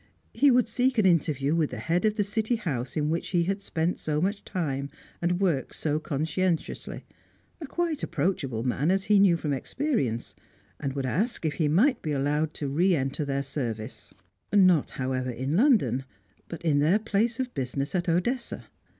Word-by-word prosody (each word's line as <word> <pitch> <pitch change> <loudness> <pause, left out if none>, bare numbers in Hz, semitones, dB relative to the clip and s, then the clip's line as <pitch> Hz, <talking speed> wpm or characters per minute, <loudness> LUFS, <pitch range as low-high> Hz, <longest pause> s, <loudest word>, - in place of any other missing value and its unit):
He 280 +5 +5
would 250 -2 +4
seek 250 +3 +1
an 215 - +4
interview 150 -5 +2
with 160 -3 +1
the 125 - -6
head 165 - 0
of 215 -1 +2
the 205 - +3
City 220 +4 0
house 135 - -3
in 150 0 +1
which 165 - -2
he 175 -2 +1
had 195 +3 -2
spent 170 -2 -1
so 150 -1 -1
much 200 +5 -1
time 140 -6 -3 0.3
and 175 +1 +1
worked 170 -9 0
so 150 -1 0
conscientiously, 160 +4 -2 0.6
a 305 - -5
quite 335 -1 -1
approachable 140 -8 -1
man 135 +5 0
as 190 +1 +2
he 205 0 +4
knew 190 -4 +5
from 150 -3 -2
experience, 135 - -2 0.4
and 135 -2 -3
would 135 -1 -2
ask 200 - -1
if 155 - +1
he 155 -1 0
might 210 - +3
be 155 - -2
allowed 150 +3 0
to 145 - -3
re 175 +7 +3
enter 135 +1 -1
their 140 -1 -1
service; 120 -4 -5 0.4
not, 185 -7 +5
however, 130 -1 -1
in 130 +5 -2
London, 185 - +3 0.4
but 170 - -8
in 150 -4 +3
their 160 +8 +4
place 225 +2 0
of 255 -1 -2
business 135 +2 -3
at 180 -1 0
Odessa. 235 +9 -1
165 Hz, 185 wpm, -27 LUFS, 140-200 Hz, 0.6 s, He